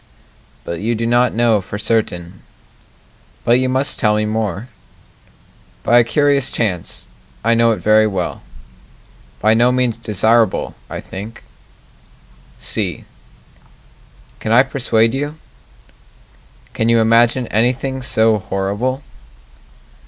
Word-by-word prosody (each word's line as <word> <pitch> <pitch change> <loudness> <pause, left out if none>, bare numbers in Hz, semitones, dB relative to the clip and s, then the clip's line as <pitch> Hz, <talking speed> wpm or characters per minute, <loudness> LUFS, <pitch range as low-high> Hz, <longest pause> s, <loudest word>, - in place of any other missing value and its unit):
But 85 -1 -5
you 115 +3 -1
do 115 +1 -2
not 120 0 +2
know 115 -3 +2
for 100 +2 -7
certain 95 -6 -2 1.0
But 120 +2 +3
you 130 0 0
must 135 +3 +1
tell 105 -1 +2
me 105 0 0
more 110 0 -3 1.2
By 120 +1 +5
a - - +5
curious 140 +2 +1
chance, 95 -7 -3 0.4
I 115 +1 +3
know 115 0 +3
it 115 - +2
very 110 0 +4
well 95 -4 -3 1.0
By 110 +2 +4
no 120 +2 +3
means 125 -3 0
desirable, 110 +1 +1 0.2
I - - -6
think 105 +5 -9 1.1
C - - -3 1.3
Can 110 - -3
I 120 +3 +6
persuade 120 -4 +1
you? 145 +3 -3 1.4
Can 115 - 0
you 115 - +4
imagine 115 +2 +3
anything 130 +4 0
so 110 -2 +2
horrible? 105 +9 -3
115 Hz, 115 wpm, -17 LUFS, 105-125 Hz, 1.4 s, I